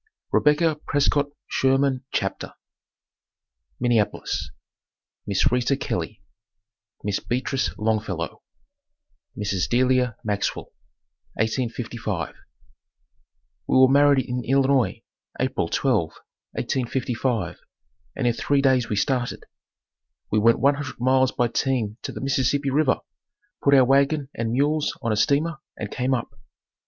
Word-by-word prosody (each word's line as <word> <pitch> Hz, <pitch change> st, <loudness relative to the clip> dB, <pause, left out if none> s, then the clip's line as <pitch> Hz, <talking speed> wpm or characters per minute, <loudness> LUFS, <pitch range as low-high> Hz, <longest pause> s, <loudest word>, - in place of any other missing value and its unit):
REBECCA 150 Hz, +1 st, +3 dB
PRESCOTT 145 Hz, 0 st, +1 dB
SHERMAN 135 Hz, 0 st, +1 dB
CHAPTER -, -, -2 dB, 1.3 s
Minneapolis 115 Hz, -4 st, 0 dB, 0.8 s
MISS 100 Hz, +2 st, +2 dB
RITA 125 Hz, +2 st, +1 dB
KELLEY 100 Hz, -3 st, -4 dB, 0.8 s
MISS 100 Hz, -1 st, -1 dB
BEATRICE 130 Hz, -1 st, -2 dB
LONGFELLOW 105 Hz, -5 st, -2 dB, 1.0 s
Mrs. 100 Hz, -3 st, -1 dB
Delilah 125 Hz, -1 st, +2 dB
Maxwell 105 Hz, -2 st, -2 dB, 0.6 s
1855. 115 Hz, -, -2 dB, 1.3 s
We -, -, +3 dB
were 130 Hz, 0 st, +8 dB
married 140 Hz, -1 st, +4 dB
in 125 Hz, 0 st, -3 dB
Illinois, 135 Hz, -4 st, +2 dB, 0.4 s
April -, -, 0 dB
12, -, -, +1 dB, 0.5 s
1855 120 Hz, -6 st, -2 dB, 0.6 s
and -, -, -2 dB
in 120 Hz, -, +3 dB
three 140 Hz, +4 st, +1 dB
days 130 Hz, -3 st, +3 dB
we 105 Hz, -, 0 dB
started. 125 Hz, +4 st, -1 dB, 0.9 s
We 110 Hz, -, +3 dB
went 115 Hz, +2 st, +4 dB
one 140 Hz, +1 st, +4 dB
hundred 145 Hz, -4 st, -6 dB
miles 130 Hz, +1 st, +3 dB
by 120 Hz, -, +1 dB
team 115 Hz, -3 st, -1 dB
to -, -, -5 dB
the -, -, -7 dB
Mississippi 135 Hz, +1 st, +1 dB
river, 145 Hz, -1 st, +2 dB, 0.6 s
put 140 Hz, 0 st, +5 dB
our 130 Hz, -2 st, +6 dB
wagon 140 Hz, +2 st, +2 dB
and 115 Hz, -1 st, -2 dB
mules 145 Hz, +4 st, +1 dB
on 115 Hz, -, 0 dB
a -, -, +2 dB
steamer, 145 Hz, +9 st, +1 dB, 0.2 s
and 105 Hz, -, -5 dB
came 130 Hz, +1 st, 0 dB
up. 120 Hz, -, -4 dB
130 Hz, 115 wpm, -24 LUFS, 110-140 Hz, 1.3 s, were